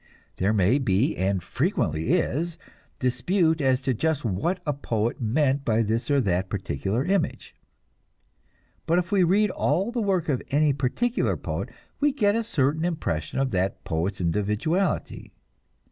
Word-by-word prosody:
There 95 +3 +1
may 110 +6 +3
be, 130 +3 +1
and 95 -1 0
frequently 85 - 0
is, 165 +5 0 0.4
dispute 160 +5 +1
as 130 -1 +2
to 130 - +1
just 150 +3 -1
what 115 - -1
a 150 - 0
poet 115 -4 -2
meant 135 +4 +1
by 115 -2 +2
this 115 +6 -1
or 140 -1 +4
that 95 -3 0
particular 100 +5 -2
image, 190 -3 -1 1.3
but 170 - +3
if 175 -1 -1
we 200 -2 +3
read 200 +4 +3
all 195 +6 0
the 240 -1 -1
work 190 -5 0
of 135 -5 0
any 145 +1 +3
particular 145 - 0
poet, - - -4 0.3
we 290 0 +3
get 205 -6 +2
a 230 - 0
certain 155 - 0
impression 155 - -2
of 135 -1 +1
that 95 +1 -1
poet's 90 +5 -2
individuality. 105 - -1
135 Hz, 150 wpm, -25 LUFS, 105-175 Hz, 1.3 s, or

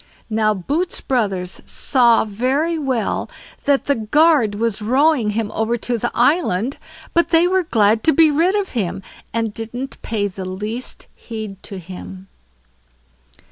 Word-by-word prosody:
Now 215 -1 +2
Boots' 295 - -2
brothers 195 -8 -1
saw 240 -4 +3
very 260 +10 0
well 260 -6 -1 0.4
that 280 -1 +2
the 285 - +3
guard 255 -1 +3
was 220 -1 -1
rowing 260 +1 +3
him 220 -2 -1
over 225 +2 0
to 240 +1 -2
the 240 - -1
island, 250 - +1 0.3
but 340 - +3
they 335 +1 +4
were 375 +1 +2
glad 220 - +2
to 320 - +6
be 315 +1 +5
rid 340 +7 +2
of 405 -2 0
him, 195 -4 -3 0.3
and 225 -2 -1
didn't 240 +5 -6
pay 215 -2 -1
the 190 -1 -7
least 210 +7 -5
heed 215 -4 -7
to 200 - -8
him. 185 +1 -10
230 Hz, 145 wpm, -20 LUFS, 210-285 Hz, 0.4 s, to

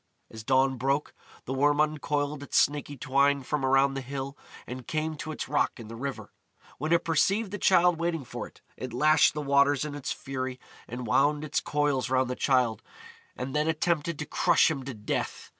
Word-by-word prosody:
As 110 0 -9
dawn 130 +1 +2
broke, 135 +4 -1 0.3
the 130 - -3
Worm 145 +2 +2
uncoiled 150 -1 0
its 145 - -2
snaky 145 0 +1
twine 140 +2 +2
from 145 +2 -2
around 135 +1 +3
the 135 - -3
hill, 135 +1 -5 0.3
and 125 0 -8
came 160 -1 -2
to 155 - -5
its 155 - -5
rock - - 0
in 110 -2 -9
the 115 - -7
river. 135 +3 -6 0.5
When 155 +4 -2
it 170 0 +4
perceived 190 +6 +1
the 205 - -4
Childe 180 -3 +4
waiting 165 -4 -1
for - - -6
it, - - -21 0.2
it 130 -2 -6
lashed 155 +6 +4
the 150 - -3
waters 140 0 +3
in 150 - -5
its 145 -1 -4
fury 130 -1 -4 0.3
and 125 +1 -6
wound 145 +6 +2
its 155 - 0
coils 145 -4 0
round 130 -1 +1
the - - -2
Childe, 125 -5 +1 0.5
and 130 +2 -5
then 150 +1 +1
attempted 160 0 0
to 150 - -4
crush - - +3
him 140 -4 -3
to 135 -3 -6
death. 105 -1 -4
140 Hz, 195 wpm, -28 LUFS, 130-150 Hz, 0.5 s, it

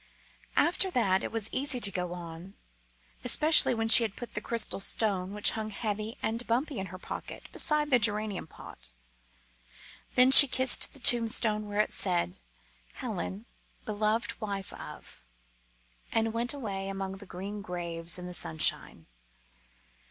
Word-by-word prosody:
After 355 +3 +1
that 200 - 0
it - - -5
was 225 -2 -2
easy 265 -1 0
to 200 -4 +4
go 180 -2 -5
on, 175 +2 -11 0.7
especially 300 +2 +4
when 225 0 -2
she 225 +1 +10
had 215 -3 -5
put 240 - -10
the - - -5
crystal 230 -4 -2
stone, 195 -2 +2
which 210 0 +1
hung 220 -1 -6
heavy 215 +1 -5
and 230 +2 -3
bumpy 255 +3 -2
in 190 - -6
the 185 - -9
pocket, - - -9
beside 300 -2 -1
the 250 - +4
geranium 210 -4 -1
pot. - - -14 1.2
Then 255 +1 +4
she 285 +1 +13
kissed 260 0 +2
the 280 - -12
tombstone 225 -3 +1
where 205 +1 -1
it - - -4
said, 175 - -1 0.5
"Helen, 95 +5 -6 0.4
beloved 215 +3 -3
wife 200 -3 -6
of - - -12 0.4
" - - -37
and 225 0 -1
went 235 +2 -2
away 195 -7 -6
among 195 0 -6
the 200 0 -14
green 200 +4 -8
graves 170 -2 -3
in 180 - -8
the 180 - -8
sunshine. 80 - -1
210 Hz, 150 wpm, -28 LUFS, 185-235 Hz, 1.2 s, she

